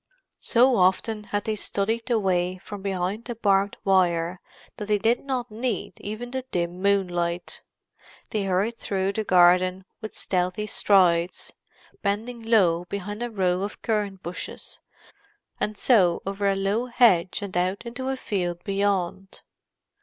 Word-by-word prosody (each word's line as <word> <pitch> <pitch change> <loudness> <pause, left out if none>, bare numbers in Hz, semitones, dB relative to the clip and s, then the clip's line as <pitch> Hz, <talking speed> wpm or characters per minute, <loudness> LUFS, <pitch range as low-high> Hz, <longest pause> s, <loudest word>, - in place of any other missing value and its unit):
So 250 +1 +4
often 210 +3 +2
had 205 0 -2
they 220 - -1
studied 220 +3 -1
the 240 -2 +2
way 185 -2 0
from 200 +2 -9
behind 195 +3 -2
the 240 - -5
barbed 200 -2 +2
wire 180 -2 +2 0.4
that 210 - -5
they 210 -1 +3
did 225 +4 +1
not 255 -4 -3
need 230 -2 -3
even 220 +4 -6
the 260 0 -2
dim 175 -1 -2
moonlight. 175 -3 0 0.7
They 210 -2 -1
hurried 195 +5 0
through 195 0 -1
the 220 - -1
garden 185 0 +4 0.2
with 220 - -7
stealthy 185 +2 -1
strides, 180 -4 +2 0.5
bending 220 +4 -2
low 185 -7 +3
behind 200 +3 -5
a 240 - -2
row 185 -4 0
of 205 +1 -5
currant 205 -4 -1
bushes, 175 +1 -7 0.8
and 210 0 -2
so 190 -8 +3
over 200 +1 0
a 195 - +1
low 200 +5 0
hedge 205 -6 +3
and 195 -3 -6
out 185 +5 0
into 255 +3 -4
a 265 - -1
field 175 -7 -3
beyond. 195 -1 -1
200 Hz, 145 wpm, -25 LUFS, 185-220 Hz, 0.8 s, So